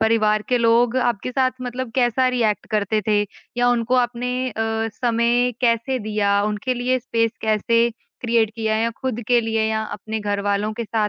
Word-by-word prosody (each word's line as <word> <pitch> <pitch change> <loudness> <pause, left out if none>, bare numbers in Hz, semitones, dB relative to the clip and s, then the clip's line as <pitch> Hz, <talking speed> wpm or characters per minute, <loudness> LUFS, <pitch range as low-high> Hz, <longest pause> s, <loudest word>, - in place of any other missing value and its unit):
परिवार 215 -1 +2
के 250 - +2
लोग 235 +1 +3
आपके 240 -2 0
साथ 260 0 +2
मतलब 250 0 -4
कैसा 255 0 +2
रिएक्ट 230 -4 0
करते 215 0 +1
थे 210 -1 +3 0.4
या 245 0 +3
उनको 240 0 +1
आपने 250 0 0
अ, 225 0 -2
समय 240 +1 +1
कैसे 240 +2 +1
दिया, 205 -2 +1
उनके 210 +4 -1
लिए 250 +1 0
स्पेस 230 -2 0
कैसे 230 +2 +2 0.3
क्रिएट 230 -2 +2
किया 220 -1 0
या 230 +1 +1
खुद 255 -3 -3
के 240 -1 +4
लिए 225 -1 -1
या 220 0 0
अपने 215 +1 -5
घरवालों 205 +1 -1
के 235 - -4
साथ 215 -1 0
230 Hz, 175 wpm, -21 LUFS, 215-245 Hz, 0.4 s, के